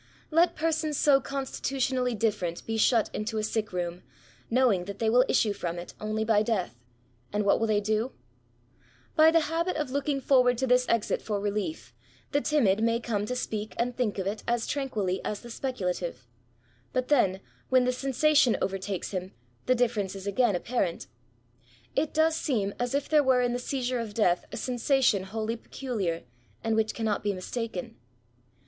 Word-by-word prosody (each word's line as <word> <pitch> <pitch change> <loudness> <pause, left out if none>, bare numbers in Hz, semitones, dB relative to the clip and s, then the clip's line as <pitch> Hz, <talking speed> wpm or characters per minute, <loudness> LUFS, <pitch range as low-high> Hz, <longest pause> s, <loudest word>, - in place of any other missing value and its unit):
Let 335 +3 +4
persons 315 -2 0
so 275 -2 +5
constitutionally 265 -2 -1
different 200 -6 -1
be 225 - -2
shut 225 0 +3
into 220 +1 -3
a 215 - 0
sick 215 0 -1
room, 175 -1 -3 0.5
knowing 230 -7 +3
that 200 +1 -6
they 220 0 +1
will 250 +2 +6
issue 210 -2 +3
from 175 -3 -4
it 175 - -7
only 215 +1 -1
by 215 -2 +4
desAk, 210 - 0 0.6
and 210 0 0
what 200 - +4
will 225 - +1
they 210 -1 +2
do? 215 +4 0 1.0
By 315 +1 +7
the 330 0 +4
habit 335 +4 -1
of 300 -4 -2
looking 280 0 0
forward 250 -2 +4
to 265 - 0
this 250 0 +3
exit 230 -2 +1
for 210 -2 -2
relief, 200 - -3 0.4
the 285 - +2
timid 220 -11 +2
may 230 0 +2
come 210 -4 -2
to 250 - -2
speak 215 -3 -4
and 245 +1 -1
think 235 -5 -1
of 190 - -2
it 205 +2 -2
as 235 -1 +1
tran 275 -2 -2
quilly 190 -5 -1
as 210 - -3
the 240 - -10
speculative; 180 - -3 0.7
but 255 0 -1
then, 195 -10 +3 0.3
when 255 -1 +5
the 250 - +2
sensation 275 0 +3
overtakes 195 0 -3
him, 185 -1 -4 0.3
the 255 - +4
difference 225 -6 0
is 195 0 -8
again 205 +1 +2
apparent. 185 -3 -1 0.9
It 315 - +1
does 315 +1 +3
seem 220 -11 -1
as 245 +2 -1
if 280 - 0
there 305 -1 +5
were 255 -2 +3
in 245 0 +1
the 245 - -1
seizure 250 -1 -2
of 220 -3 -5
death 180 -6 +2
a - - -5
sensation 245 -5 +2
wholly 220 +3 -3
peculiar, 210 -10 -3 0.4
and 225 -1 +1
which 220 0 0
cannot 220 -3 -1
be 205 -1 0
mistaken. 190 - -5
230 Hz, 180 wpm, -28 LUFS, 205-255 Hz, 1.0 s, By